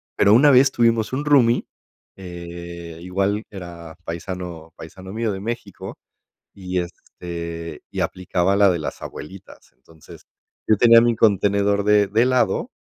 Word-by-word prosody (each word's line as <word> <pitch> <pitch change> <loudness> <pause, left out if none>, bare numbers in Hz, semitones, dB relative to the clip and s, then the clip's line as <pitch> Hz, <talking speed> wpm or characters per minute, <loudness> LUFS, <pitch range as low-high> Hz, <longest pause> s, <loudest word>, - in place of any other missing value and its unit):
Pero 100 - +4
una 140 +6 +6
vez 135 +1 +5
tuvimos 115 -2 +1
un 145 +3 -2
roomie, 125 -5 +3 0.5
eh, 85 -2 -9
igual 95 +4 -1
era 85 -4 -10
paisano 85 -1 -7
paisano 95 +3 -11
mío 110 +1 -2
de 95 - -5
México, 115 -2 -6 0.6
y 90 -1 -4
este, 85 -2 -8
y - - -5
aplicaba 90 +1 0
la 100 0 +5
de 90 - -1
las 75 - -6
abuelitas. 95 +5 -11
Entonces, 80 -2 -17 0.4
yo 110 - +4
tenía 115 +2 +7
mi 120 0 +2
contenedor 100 -1 +2
de 105 -1 +3
de 110 +4 +2
helado 125 0 +1
95 Hz, 140 wpm, -21 LUFS, 85-110 Hz, 0.6 s, tenía